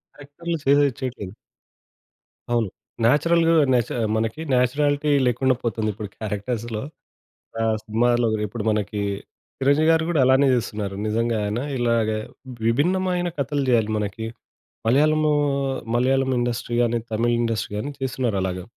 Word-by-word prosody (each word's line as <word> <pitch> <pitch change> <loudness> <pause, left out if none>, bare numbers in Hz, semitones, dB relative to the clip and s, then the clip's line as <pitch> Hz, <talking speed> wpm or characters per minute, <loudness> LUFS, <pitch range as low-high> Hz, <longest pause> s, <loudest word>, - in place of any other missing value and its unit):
క్యారెక్టర్లు 155 +4 -5
చేదయి 140 0 +4
చేయట్లేదు. 120 -8 -5 1.2
అవును. 120 -4 +1 0.4
నేచురల్‌‌గ 165 +6 +3 0.2
నేచ 120 -2 +2 0.3
మనకి 110 +7 -2
నేచురాలిటీ 145 +4 +2 0.2
లేకుండా 130 +2 +2
పోతుంది 110 -2 -1
ఇప్పుడు 105 0 -7
క్యారెక్టర్స్‌లో. 110 +1 -3 0.8
ఆహ్ 110 -1 +2
సినిమాల్లో 120 +2 +2 0.2
ఇప్పుడు 105 +1 -5
మనకి 105 -1 -2 0.6
చిరంజీవి 145 +4 +3
గారు 160 0 +3
గూడా 165 -4 +1
అలానే 130 +2 +5
చేస్తున్నారు. 105 -4 -3
నిజంగాయన 110 -1 0 0.2
ఇలాగ 115 -2 +1 0.6
విభిన్నమైన 180 +8 +1
కథలు 140 +1 -1
జేయాలి 115 -3 +3
మనకి. 105 +2 -3 0.6
మలయాళం, 155 +6 +3 0.7
మలయాళం 130 +2 +2
ఇండస్ట్రీ 120 -1 -2
గాని, 120 0 +1
తమిళ్ 115 +2 +1
ఇండస్ట్రీ 115 -3 -2
గాని 130 +8 -3
తిస్తున్నారలాగా. 100 -9 -2
120 Hz, 110 wpm, -23 LUFS, 110-140 Hz, 1.2 s, అలానే